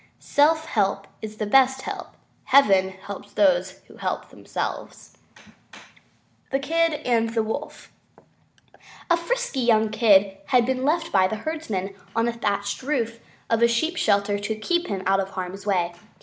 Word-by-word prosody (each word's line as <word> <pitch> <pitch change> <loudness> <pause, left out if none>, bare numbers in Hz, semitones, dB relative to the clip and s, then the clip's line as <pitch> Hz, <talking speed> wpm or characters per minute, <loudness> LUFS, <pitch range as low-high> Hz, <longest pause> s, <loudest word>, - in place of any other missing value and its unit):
Self 315 +2 +2
help 200 -2 0 0.2
is 215 0 -7
the 215 - -2
best 265 +4 +3
help. - - -7 0.3
Heaven 195 -9 +5
helps 200 +1 -10
those 185 -1 +2
who - - -16
help - - -3
themselves. - - -6 1.3
THE 270 - +1
KID 330 +3 +1
AND 230 -2 +1
THE 225 - +2
WOLF 250 +7 -6 1.2
A - - +7
frisky 485 - -2
young 220 -3 +3
Kid 200 -3 +4
had 250 -3 +4
been 260 0 -1
left 325 +4 0
by 185 -1 +4
the 220 - -3
herdsman 220 - -3 0.2
on 230 0 +2
the 235 - 0
thatched 205 -3 -2
roof 240 -5 -2 0.3
of 230 0 +1
a 235 - +6
sheep 315 +9 0
shelter 205 - +1
to 215 +2 -3
keep 345 +11 -1
him 195 -2 -3
out 195 +1 +3
of 195 0 -2
harm's 190 +1 -6
way. 175 -3 +1
220 Hz, 155 wpm, -24 LUFS, 195-270 Hz, 1.3 s, A